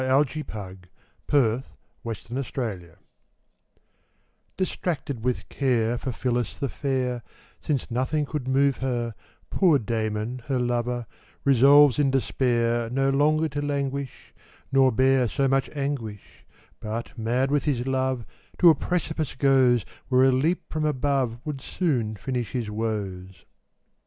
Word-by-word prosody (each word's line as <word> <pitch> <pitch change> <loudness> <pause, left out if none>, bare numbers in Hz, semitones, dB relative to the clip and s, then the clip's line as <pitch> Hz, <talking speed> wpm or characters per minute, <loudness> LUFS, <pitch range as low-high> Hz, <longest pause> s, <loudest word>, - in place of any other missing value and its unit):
William 130 0 +2
Walsh 140 -1 +3 0.9
The 130 -2 +2 0.5
Despairing 120 -5 -4
Lover 85 -1 -18 1.6
DISTRACTED 155 -9 -3
with 125 0 -1
care, 120 -3 0
For 130 - -3
Phillis 120 0 -2
the 140 - -2
fair, 130 -3 -2 0.4
Since 140 -5 -2
nothing 130 +5 0
could 145 -3 -4
move 135 +1 +3
her, 120 -3 -2 0.4
Poor 175 -7 +4
Damon, 110 +1 -2
her 135 -2 0
lover, 120 0 -1 0.4
Resolves 140 +1 +6
in 140 -2 +3
despair 120 -2 +1
No 135 +2 +1
longer 155 +3 +3
to 145 +1 -3
languish, 140 -2 -3 0.4
Nor 135 -1 +5
bear 130 +1 +3
so 135 +4 0
much 135 0 +1
anguish; 135 -8 -5 0.3
But, 110 +2 -5
mad 125 +4 0
with 145 -2 +1
his 130 -5 0
love, 130 -2 -1 0.3
To 175 -2 +8
a - - +5
precipice 160 -1 -2
goes; 130 -4 +4 0.2
Where 130 0 +4
a 135 - +5
leap 155 +8 +1
from 155 -1 -1
above 135 -4 0
Would 145 -3 -4
soon 125 - -1
finish 120 +2 -4
his 115 -5 -2
woes. 100 -4 -4
130 Hz, 130 wpm, -25 LUFS, 120-140 Hz, 1.6 s, To